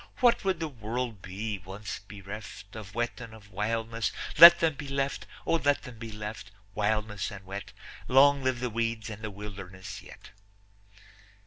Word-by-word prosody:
What 240 -3 +4
would 190 -3 +1
the 165 - -1
world 120 -4 -4
be, 100 +3 -4
once 95 +3 -7
bereft 100 +1 -9
Of 110 -1 -9
wet 120 0 -2
and 115 -1 -9
of 100 -2 -16
wildness? 115 +2 -1 0.3
Let 170 0 +13
them 165 -1 +3
be 145 0 -7
left, 135 0 -2 0.2
O - - +1
let 145 0 +3
them 125 -4 -10
be 115 0 -6
left, 105 -1 -6 0.2
wildness 105 -1 0
and 95 -2 -10
wet; 100 +1 -6 0.4
Long 140 +2 +6
live 130 -2 0
the 125 -2 -1
weeds 115 -1 -2
and 105 0 -8
the 110 - -4
wilderness 95 -2 -8
yet. - - -14
110 Hz, 170 wpm, -29 LUFS, 100-125 Hz, 0.4 s, Let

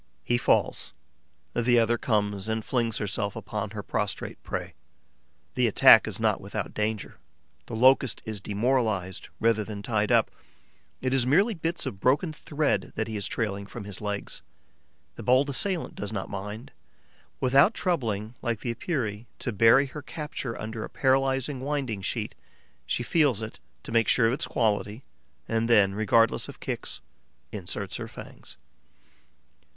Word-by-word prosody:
He 120 0 +1
falls; 110 - +1 0.6
the 120 0 +3
other 115 0 +4
comes 105 -2 0
and 110 -1 -2
flings 115 -4 0
herself 100 0 -2
upon - - -4
her - - -6
prostrate - - -3
prey. - - -5 0.8
The - - +2
attack - - +7
is - - -4
not - - +1
without - - -5
danger. 105 -1 -3 0.5
The - - -5
Locust 130 +2 +4
is 110 -3 -4
demoralized 105 -4 0
rather 115 -1 +2
than 105 -1 -7
tied 105 -2 0
up; - - +4 0.7
it 130 0 0
is 130 -2 +2
merely 200 - +4
bits 165 -1 -2
of 95 - -5
broken 150 - +2
thread 145 -10 -1
that 110 - -1
he 110 - -5
is 100 -2 -2
trailing 100 -3 -2
from 120 +1 -8
his 100 -2 -8
legs. 105 -1 -3 0.8
The - - -6
bold 130 +3 +3
assailant 180 +5 0
does 105 0 -4
not 100 -3 -4
mind. 105 +4 -6 0.7
Without 135 - +5
troubling, 115 - -1
like 115 -3 -2
the 120 - -2
Epeirae, 115 - -3
to 125 - -3
bury 115 +6 +6
her 145 +2 -8
capture 145 -5 -5
under 110 0 -5
a - - -6
paralysing 135 0 +1
winding 135 -6 -2
sheet, - - -3 0.5
she 120 - 0
feels 135 -6 +2
it, 110 - -7 0.2
to - - -8
make 115 -1 +3
sure 125 - +4
of 115 - +3
its 135 - -1
quality, 110 +1 0 0.4
and 115 +1 0
then, 100 -4 +5
regardless 110 +2 +2
of - - -10
kicks, - - -4 0.5
inserts 95 -5 -4
her - - -5
fangs. - - -11
115 Hz, 155 wpm, -27 LUFS, 105-130 Hz, 0.8 s, attack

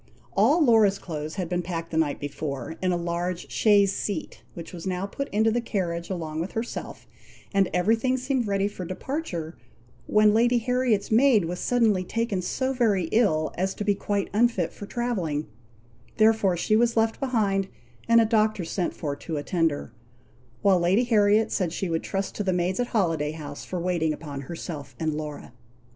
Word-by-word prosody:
All 275 - +4
Laura's 220 -5 +5
clothes 155 -4 -6
had 185 -3 -2
been 175 +1 -1
packed 170 -1 -5
the 160 - -2
night 155 -3 +1
before, 145 0 -5
in 185 -1 +1
a 175 - +1
large 170 +1 -3
chaise 200 -2 +4
seat, 195 -7 -4
which 170 +1 -8
was 175 +1 -6
now 185 +1 -1
put 275 +7 -5
into 220 +2 +2
the 240 +2 0
carriage 175 -7 -3
along 160 -4 -4
with 180 - -5
herself, 225 +2 -5 0.5
and 195 -2 +3
every 180 +6 +3
thing 255 +3 0
seemed 255 -2 -1
ready 200 0 +1
for 205 -3 -7
departure, 180 - -4 0.5
when 210 0 +5
Lady 240 +2 +4
Harriet's 240 -3 0
maid 230 -4 +5
was 175 +2 -4
suddenly 225 -6 +2
taken 220 -1 -1
so 260 +8 -1
very 205 -9 +1
ill, 160 -9 +2
as 190 +2 -2
to - - -3
be 205 - +3
quite 200 0 -2
unfit 215 -6 +2
for 205 - -9
travelling; 185 -13 -2 0.7
therefore 215 -4 +4
she 215 +5 +1
was 230 +1 +2
left 225 0 +2
behind, 210 -7 +1 0.4
and 230 0 +6
a 225 - +5
doctor 215 -4 +1
sent 175 +1 -2
for 145 -4 -3
to 155 +2 -5
attend 165 +3 +1
her; 145 - -7 0.7
while 195 -3 +5
Lady 185 +7 +3
Harriet 215 -2 +3
said 180 -5 0
she 180 +2 -3
would 165 - 0
trust 195 0 -3
to 210 - -3
the 190 - +1
maids 180 +3 0
at 245 - +1
Holiday 165 -9 0
House, 145 -2 -8
for 180 - -4
waiting 170 -3 0
upon 145 -2 -7
herself 150 -1 -7
and 160 -2 0
Laura. 150 -4 -6
195 Hz, 185 wpm, -26 LUFS, 170-225 Hz, 0.7 s, and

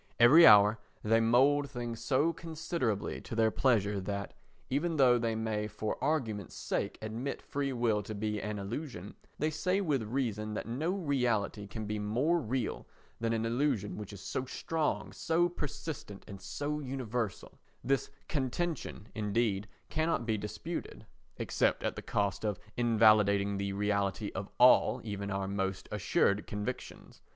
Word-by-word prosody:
Every 140 +8 +9
hour 105 +1 +7 0.2
they 115 +1 +4
mould 135 +5 +4
things 120 -3 -5
so 145 +7 +2
considerably 160 - -3
to - - -7
their 110 -1 +3
pleasure 105 -6 +2
that, 100 +1 -4 0.3
even 155 +5 0
though 125 -3 +5
they 115 -1 0
may 110 -1 -1
for 110 +2 -4
argument's 115 - -1
sake - - -2
admit 115 +6 -3
free 140 -1 -3
will 115 -4 +1
to 105 +2 -6
be 105 0 -2
an 105 0 -3
illusion, 105 - -5 0.2
they 155 +1 0
say 180 +5 0
with 150 - +1
reason 110 -2 -2
that - - -3
no 135 +9 -1
reality 125 - 0
can 110 +1 -6
be 105 0 -2
more 125 +12 +1
real 125 -3 -3 0.3
than 115 0 0
an 115 0 0
illusion 115 -5 0
which 105 -1 -7
is 100 -2 -9
so 130 - -3
strong, 155 +4 -2
so 165 +1 +2
persistent 150 - -6
and 100 -2 -9
so 145 +10 -3
universal; 125 -6 -4 0.2
this 135 -1 +1 0.2
contention, 140 - -2
indeed, 105 -1 0 0.2
cannot 160 -6 0
be 110 -1 +1
disputed 110 - -5 0.3
except - - +1
at - - -1
the - - -5
cost 100 0 -1
of 105 -4 -1 0.2
invalidating 105 -4 +4
the 100 0 -2
reality 100 0 0
of 100 +1 -5
all 125 +1 +6
even 100 -2 -4
our 95 -1 -2
most 95 -1 -2
assured 105 0 +1
convictions. 105 +5 -6
115 Hz, 150 wpm, -32 LUFS, 105-140 Hz, 0.3 s, Every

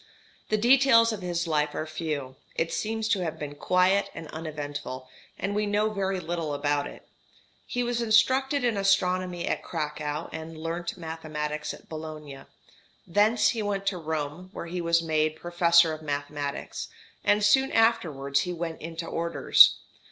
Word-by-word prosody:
The 215 - +2
details 235 -1 +5
of 205 - -6
his 175 -1 -2
life 150 -2 0
are 155 - -2
few; 155 -4 -4 0.2
it 165 0 -1
seems 220 0 -2
to 205 - +2
have 160 - -3
been 145 -1 -6
quiet 185 +6 +2
and 165 -1 -7
uneventful, 145 -4 -6 0.3
and 200 - -2
we 210 0 0
know 210 +1 +1
very 195 -2 -1
little 165 -4 -3
about 145 0 0
it. - - -13 0.6
He 245 - -1
was 240 0 -1
instructed 260 +5 +3
in 235 -4 +1
astronomy 185 -2 +1
at - - -1
Cracow, 150 -1 -3
and 160 0 -7
learnt 170 +3 -4
mathematics 155 -2 -4
at - - -12
Bologna. 155 -3 -8 0.6
Thence 210 +6 +3
he 230 - -1
went 200 -1 -2
to 195 -2 -1
Rome, 160 +2 -4
where - - -6
he 175 +1 -4
was 170 0 +2
made 155 -1 +1
Professor 170 -1 +4
of 155 - -7
Mathematics; 145 -1 -4 0.4
and 205 0 +3
soon 265 +6 +4
afterwards 160 -13 +2
he 180 - -2
went 165 -1 -5
into 165 +1 -5
orders. 170 0 +5
170 Hz, 160 wpm, -27 LUFS, 155-205 Hz, 0.6 s, details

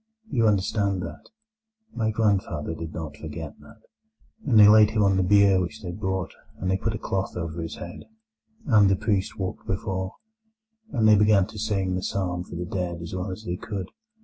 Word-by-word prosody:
You 115 -4 +3
understand 100 -2 +1
that? - - -9 0.6
My 110 -2 0
grandfather 100 -8 0
did 80 0 -6
not 80 -2 -6
forget 80 0 -7
that. 110 0 -17 0.6
And 115 -6 +4
they 105 - +10
laid 105 0 +7
him 110 -1 +1
on 100 -1 +3
the 95 - +2
bier 100 0 +5
which 90 +2 -5
they 90 - -4
brought, 95 -2 -3 0.2
and 95 +1 -2
they 95 - +2
put 110 +3 -2
a - - -3
cloth 95 -2 -3
over 85 -1 -4
his 80 - -5
head, 85 0 -9 0.6
and 105 - +5
the 95 - +4
priest 100 0 -1
walked 95 -2 -5
before; 95 -1 -3 0.8
and 110 -3 +2
they 110 - +8
began 105 -2 +4
to 105 +1 -10
sing 100 -3 0
the 90 - -1
psalm 90 -2 -2
for 90 - -10
the 90 +1 -3
dead 90 -1 -3
as 85 - -7
well 90 +2 -3
as 95 +4 -7
they 90 -4 -3
could. 100 -2 -5
95 Hz, 200 wpm, -25 LUFS, 90-105 Hz, 0.8 s, they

